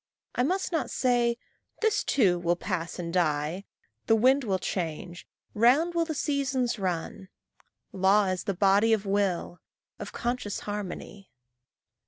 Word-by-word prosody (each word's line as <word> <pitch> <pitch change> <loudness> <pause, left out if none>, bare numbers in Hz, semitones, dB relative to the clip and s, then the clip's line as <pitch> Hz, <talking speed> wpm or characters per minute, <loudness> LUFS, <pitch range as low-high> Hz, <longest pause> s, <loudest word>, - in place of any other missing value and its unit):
I - - 0
must 370 +10 0
not 325 - -1
say 240 -2 +1 0.4
"This 440 -2 +2
too 190 -10 +2
will 175 0 +1
pass 175 -2 -4
and 170 -2 -5
die," 160 +2 0 0.4
"The 225 - +5
wind 260 +5 +4
will 195 -5 0
change," 175 -1 -4 0.3
"Round 265 +10 +4
will 335 -1 +1
the 315 -2 -4
seasons 265 -5 -1
run." 185 0 -3 0.6
Law 195 +2 +3
is 185 -2 -2
the 200 - -1
body 200 +4 +4
of 215 -2 0
will, 195 -3 -1 0.4
of - - -6
conscious 240 -4 -3
harmony. 205 -1 -6
205 Hz, 140 wpm, -27 LUFS, 180-250 Hz, 0.6 s, The